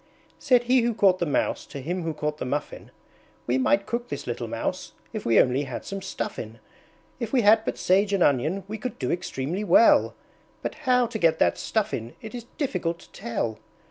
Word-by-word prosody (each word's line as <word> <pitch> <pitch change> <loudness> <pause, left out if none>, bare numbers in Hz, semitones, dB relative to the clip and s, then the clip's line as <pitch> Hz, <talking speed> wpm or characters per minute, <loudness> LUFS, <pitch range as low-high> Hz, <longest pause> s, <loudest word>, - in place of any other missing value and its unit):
Said 250 -4 +4
he 250 +1 +4
who 235 -1 0
caught 190 -3 +4
the 175 - 0
Mouse 145 - 0
to 140 - -7
him 175 +7 -3
who 165 -1 -2
caught 150 0 -3
the - - -2
Muffin, 140 +4 -4 0.6
"We 125 +3 +1
might 195 +10 +2
cook 240 +2 -3
this - - -5
little - - -4
Mouse, - - -4 0.2
if 215 - -4
we 115 - +5
only 130 +3 +3
had 130 -2 -6
some 195 0 -5
Stuffin'! 115 - -5 0.6
If 230 -2 -4
we 260 - +3
had 220 +1 +5
but - - -2
Sage 195 +2 +2
and 195 -3 +3
Onion 155 +8 +1
we 215 +1 -5
could 250 +4 -5
do 125 - -2
extremely 175 +1 -3
well; 300 +5 +5 0.5
But - - -2 0.2
how 250 -1 +5
to 230 -1 -5
get 165 -3 +3
that - - +2
Stuffin' 200 - -2
it 220 - -9
is 240 -1 -7
difficult 180 - -1
to - - -18
tell!" 115 -2 -3
190 Hz, 205 wpm, -25 LUFS, 145-230 Hz, 0.6 s, we